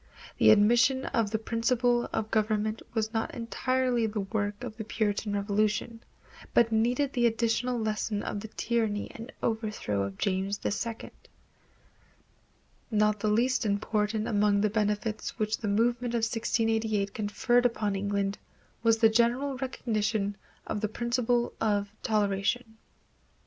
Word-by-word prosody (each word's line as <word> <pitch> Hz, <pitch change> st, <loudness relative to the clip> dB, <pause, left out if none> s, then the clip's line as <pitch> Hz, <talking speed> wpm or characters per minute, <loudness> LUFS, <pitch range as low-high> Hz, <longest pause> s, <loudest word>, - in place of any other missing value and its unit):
The -, -, +6 dB
admission 235 Hz, +5 st, +5 dB
of 225 Hz, -3 st, 0 dB
this 220 Hz, +1 st, -2 dB
principle 240 Hz, +1 st, +1 dB
of 215 Hz, 0 st, -2 dB
government 215 Hz, 0 st, 0 dB
was 220 Hz, 0 st, -1 dB
not 225 Hz, -1 st, -2 dB
entirely 245 Hz, 0 st, 0 dB
the 210 Hz, -1 st, -2 dB
work 205 Hz, +2 st, -3 dB
of 240 Hz, -3 st, -6 dB
the 220 Hz, -, -5 dB
Puritan 210 Hz, -1 st, -1 dB
Revolution, 210 Hz, +3 st, 0 dB, 0.5 s
but 230 Hz, -1 st, +5 dB
needed 245 Hz, +5 st, +1 dB
the 240 Hz, -2 st, +3 dB
additional 230 Hz, +2 st, 0 dB
lesson 215 Hz, -1 st, -1 dB
of 205 Hz, -, -3 dB
the 220 Hz, -, -7 dB
tyranny 220 Hz, -2 st, -1 dB
and 230 Hz, +4 st, -9 dB
overthrow 215 Hz, -, -1 dB
of 100 Hz, 0 st, -4 dB
James 195 Hz, +1 st, -1 dB
II. 225 Hz, +2 st, -3 dB, 1.8 s
Not 210 Hz, -1 st, +2 dB
the 215 Hz, -, -1 dB
least 245 Hz, +4 st, +2 dB
important 210 Hz, +1 st, 0 dB
among 205 Hz, -1 st, +2 dB
the 215 Hz, -1 st, +1 dB
benefits 210 Hz, 0 st, -1 dB
which 215 Hz, -1 st, -1 dB
the 220 Hz, -, -3 dB
movement 235 Hz, +3 st, +1 dB
of 230 Hz, -, 0 dB
1688 225 Hz, -3 st, 0 dB
conferred 240 Hz, +3 st, +1 dB
upon 210 Hz, -4 st, -2 dB
England 200 Hz, 0 st, -1 dB, 0.4 s
was 225 Hz, -1 st, +4 dB
the 225 Hz, 0 st, +6 dB
general 240 Hz, +5 st, +2 dB
recognition 215 Hz, -5 st, -1 dB, 0.3 s
of 205 Hz, -, -3 dB
the 215 Hz, -, 0 dB
principle 240 Hz, +1 st, 0 dB
of 205 Hz, -2 st, +1 dB
toleration. 215 Hz, +2 st, 0 dB
220 Hz, 135 wpm, -29 LUFS, 210-235 Hz, 1.8 s, The